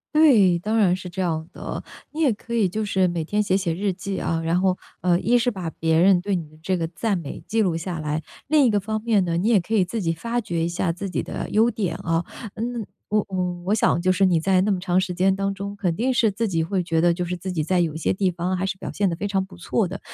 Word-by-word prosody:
对， 215 - +6
当 215 +5 -1
然 190 -5 +4
是 185 -1 -7
这 185 +2 -3
样 160 -2 -2
的， - - -6 0.3
你 315 +2 -4
也 280 - +4
可 230 +3 -9
以 220 -5 +2
就 215 +4 -2
是 190 -2 +2
每 170 -2 -2
天 210 +5 0
写 195 -2 +2
写 180 -4 -1
日 195 +3 -1
记 190 +2 -4
啊， 165 - -1
然 165 +3 +1
后， 185 -1 +2 0.2
呃， 175 -1 +3
一 240 +4 +3
是 240 +1 +2
把 180 -7 -5
别 160 0 +1
人 185 0 +5
对 200 0 -1
你 165 -3 -4
的 155 - -19
这 185 +2 0
个 165 -1 -1
赞 195 +4 -1
美 160 -5 -7
记 225 0 +2
录 180 -4 +1
下 170 +1 -4
来， 155 0 -2 0.3
另 300 0 +4
一 250 - +5
个 205 -2 +2
方 215 +2 -3
面 215 -5 +2
呢， 170 -1 0
你 195 +6 0
也 215 -5 +5
可 195 +6 -5
以 205 - +4
自 205 +4 -3
己 165 -1 +1
发 230 +8 -2
掘 175 -8 -2
一 - - +1
下 170 0 0
自 190 +3 -5
己 - - -2
的 - - -5
优 225 +3 +3
点 190 -7 -2
啊， 170 -2 -1 0.3
嗯， 230 -1 -3 0.2
我 210 -1 +1
我 180 -2 -1
我 205 - +3
想 190 -5 +2
就 185 - +4
是 195 +1 +3
你 175 -3 +3
在 185 +2 +3
那 205 +1 +1
么 190 - 0
长 180 0 +1
时 185 -1 -2
间 190 +1 +3
当 195 0 -1
中， 200 +1 -6
肯 185 -5 -1
定 255 +7 +1
是 225 -3 +3
自 220 +3 -1
己 165 -4 0
会 185 +2 -1
觉 165 -1 +1
得 175 0 +4
就 175 +1 -2
是 180 +1 -3
自 185 +2 -5
己 160 -4 -1
在 180 +3 +1
有 165 -3 0
些 160 - 0
地 190 0 +1
方， 175 +2 -2
还 185 +1 -1
是 190 - -3
表 - - -6
现 200 -2 +1
得 170 - -2
非 200 +4 -3
常 195 -1 0
不 185 -1 -15
错 185 +3 0
的， 195 +3 -6
185 Hz, 310 characters per minute, -23 LUFS, 175-205 Hz, 0.3 s, 对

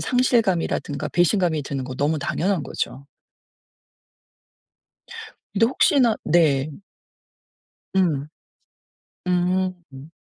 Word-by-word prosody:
상실감이라든가 190 - 0
배신감이 175 -3 +1
드는 135 -2 -4
거 130 - -6
너무 150 +3 0
당연한 180 +3 -1
거죠. 135 0 -4 2.5
근데 225 +3 +4
혹시나 255 -2 +3
네. 150 -4 +3 1.2
음. 160 -7 +1 1.0
음. 180 -5 -2
175 Hz, 170 characters per minute, -23 LUFS, 145-190 Hz, 2.5 s, 근데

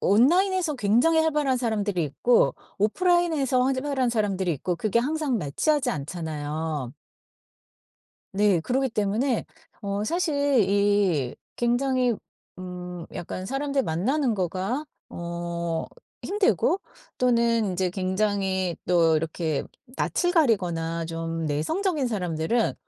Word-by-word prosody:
온라인에서 340 - +3
굉장히 245 +9 +3
활발한 295 -5 +1
사람들이 205 -7 0
있고 235 - +2 0.2
오프라인에서 305 - +2
활발한 265 0 0
사람들이 195 -5 0
있고 175 +5 -2
그게 215 +5 +1
항상 285 0 0
매치하지 260 - 0
않잖아요. 150 -2 -4 1.4
네. 200 -3 +3
그러기 260 +8 0
때문에 220 +4 0 0.4
어 200 0 -2
사실 285 - +1
이 200 -9 +2 0.2
굉장히 250 0 +1 0.4
음 180 -1 -7
약간 185 +2 -5
사람들 275 +3 -1
만나는 245 - 0
거가 190 - -2 0.2
어 170 -1 -4 0.4
힘들고 395 -1 +1 0.4
또는 235 -4 +2
이제 180 0 0
굉장히 190 -1 0
또 165 -3 +4
이렇게 160 -1 -1 0.3
낯을 355 0 0
가리거나 170 - +1
좀 165 0 -3
내성적인 290 - 0
사람들은 180 +1 0
210 Hz, 260 characters per minute, -25 LUFS, 175-265 Hz, 1.4 s, 또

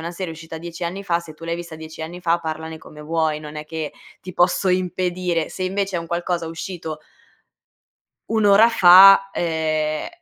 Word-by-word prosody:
una 170 - -4
serie 175 -1 -5
uscita 160 0 -9
10 170 +1 -9
anni 190 +4 -5
fa, 170 -2 0
se 160 -2 -12
tu 165 - -12
l'hai 170 0 -2
vista 170 -2 -8
10 160 0 -9
anni 175 +3 -7
fa 170 0 +1
parlane 160 -1 -6
come 150 -1 -14
vuoi, 160 -1 -1
non 150 0 -10
è 150 - -6
che 155 -1 -5 0.3
ti 185 - -9
posso 180 +1 +2
impedire. 180 -2 -1
Se, 185 - -6
invece, 195 0 -2
è - - -2
un 165 - -8
qualcosa 170 -1 -2
uscito 165 -1 -6 1.3
1 220 -1 +1
ora 205 +3 +6
fa, 195 -1 +8
uhm, 155 -2 -1
170 Hz, 190 wpm, -21 LUFS, 160-185 Hz, 1.3 s, fa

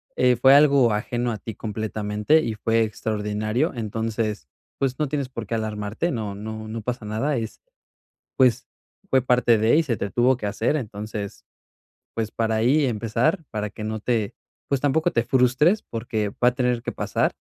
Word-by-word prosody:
eh, 125 0 +4
fue 135 +1 +7
algo 140 -5 +5
ajeno 120 +3 -1
a 110 - -3
ti 110 +1 -7
completamente 105 +6 0
y 115 - -2
fue 115 +2 +2
extraordinario. 110 - -1
Entonces, 110 - -3 0.3
pues, 130 -2 0
no 150 - +1
tienes 140 -2 -2
por 115 -3 -6
qué 115 - -1
alarmarte, 110 +7 -2
no 105 -5 -3
no 110 +1 -6
no 115 +1 -5
pasa 120 0 -4
nada, 110 +8 -1
es 115 -1 -5 0.8
pues, 130 -3 +3 0.4
fue 130 -1 +4
parte 125 -2 +3
de 110 +6 +4
y 165 - +4
se 130 -8 -1
te 100 - -3
tuvo 125 +4 +3
que 110 - -5
hacer. 115 +8 0
Entonces, 105 -4 -6 0.7
pues, 110 -1 -2
para 115 -1 0
ahí 130 +7 +3
empezar, 120 - 0
para 105 -1 -3
que 105 - -8
no 110 0 -3
te, 110 -3 -1 0.3
pues, 140 -2 +1
tampoco 155 +4 +2
te 115 - +1
frustres 130 - +3
porque 115 -2 -3
va 120 +4 +3
a 125 - -9
tener 125 -2 +1
que - - -3
pasar, - - 0
115 Hz, 180 wpm, -24 LUFS, 110-130 Hz, 0.8 s, fue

